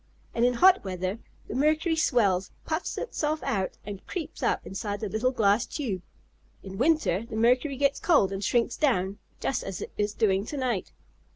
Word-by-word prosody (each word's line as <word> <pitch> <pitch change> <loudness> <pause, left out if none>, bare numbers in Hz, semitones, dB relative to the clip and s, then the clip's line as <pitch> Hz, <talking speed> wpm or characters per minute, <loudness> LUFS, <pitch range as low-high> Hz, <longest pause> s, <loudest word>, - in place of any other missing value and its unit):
"And 235 - +1
in 245 0 +3
hot 370 +8 +6
weather 185 +2 -3 0.3
the - - -5
mercury 310 +4 +2
swells, 200 - +2 0.2
puffs 315 +2 -2
itself 310 -9 -2
out 190 -3 -1
and 200 -2 -7
creeps 330 -4 -5
up - - 0
inside 205 +1 -4
the 215 - -3
little 220 +5 +1
glass 220 -3 +2
tube. 220 - -3 0.6
In 195 +1 -8
winter 260 - +2
the 220 - -5
mercury 250 +5 +2
gets 280 +1 +2
cold, 285 - +3
and 195 +1 -4
shrinks 235 +3 +1
down, 200 -8 +1 0.2
just 270 - -1
as 195 -2 -5
it - - -6
is 210 0 0
doing 195 -3 +2
to 295 - -4
night." 245 -8 -1
230 Hz, 180 wpm, -27 LUFS, 195-290 Hz, 0.6 s, hot